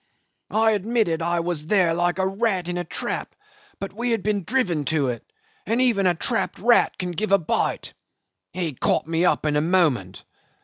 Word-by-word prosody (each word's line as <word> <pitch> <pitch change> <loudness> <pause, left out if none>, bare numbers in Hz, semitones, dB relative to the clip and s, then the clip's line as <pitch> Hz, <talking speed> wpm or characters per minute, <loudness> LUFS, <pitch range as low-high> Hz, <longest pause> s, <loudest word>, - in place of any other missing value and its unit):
I 220 +1 +3
admitted 210 -5 0
I 170 +1 0
was 165 -3 -3
there 180 -4 +3
like 175 +1 0
a 190 - +1
rat 195 -2 0
in 175 - -3
a 175 - -2
trap, 170 - -4 0.4
but 195 - -6
we 240 +4 -2
had 225 -5 0
been 205 -2 0
driven 195 - 0
to 145 -4 +1
it, 120 -2 -5 0.4
and 230 - +1
even 230 -7 +3
a 175 - +2
trapped - - -1
rat 235 +3 +3
can 180 -1 -3
give 200 +4 -3
a 200 - +7
bite. 170 - -2 0.6
He 175 -4 -3
caught - - 0
me 165 +2 0
up - - +1
in 150 -1 +1
a 150 - +3
moment. 150 - +1
180 Hz, 190 wpm, -23 LUFS, 165-210 Hz, 0.6 s, a